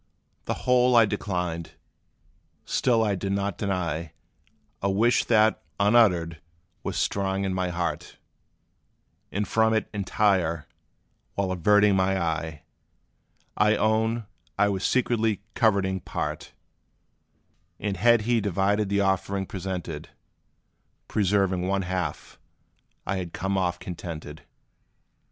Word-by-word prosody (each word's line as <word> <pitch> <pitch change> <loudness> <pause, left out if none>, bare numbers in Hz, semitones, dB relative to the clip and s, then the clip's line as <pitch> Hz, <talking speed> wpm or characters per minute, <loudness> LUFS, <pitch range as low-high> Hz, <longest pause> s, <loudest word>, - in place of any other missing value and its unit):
The - - -1
whole 125 0 +4
I 115 -1 +7
declined; 90 -5 -3 0.9
still 120 -3 +2
I 105 -2 +1
did 95 +1 -2
not 100 0 -2
deny 85 -5 -2 0.7
A 100 - +1
wish 115 +5 +3
that, 110 -1 +3 0.2
unuttered, 95 -7 +3 0.4
was - - -4
strong 95 0 0
in 95 -1 -1
my 95 -1 -1
heart; 85 -3 -3 1.1
And 100 +1 -2
from 110 +1 +3
it 110 - 0
entire, 95 -5 +1 0.7
while 100 -2 -1
averting 105 +3 +4
my 95 0 +2
eye, 80 -3 -3 0.9
I 105 +1 +3
own 110 +2 +1 0.3
I 100 +1 +3
was 95 -1 -2
secretly 115 -4 +1
coveting 100 -4 +2
part; - - -5 1.3
And 100 -2 -2
had 115 +4 +4
he 115 +1 +1
divided 100 +1 +1
the 100 0 +2
offering 95 0 0
presented, 90 -5 -5 1.0
Preserving 95 -3 +1
one 100 0 0
half, 90 -2 -4 0.7
I 95 - -1
had 90 -3 -5
come 95 +2 -2
off 90 -2 0
contented. 80 -4 -7
95 Hz, 115 wpm, -26 LUFS, 90-105 Hz, 1.3 s, I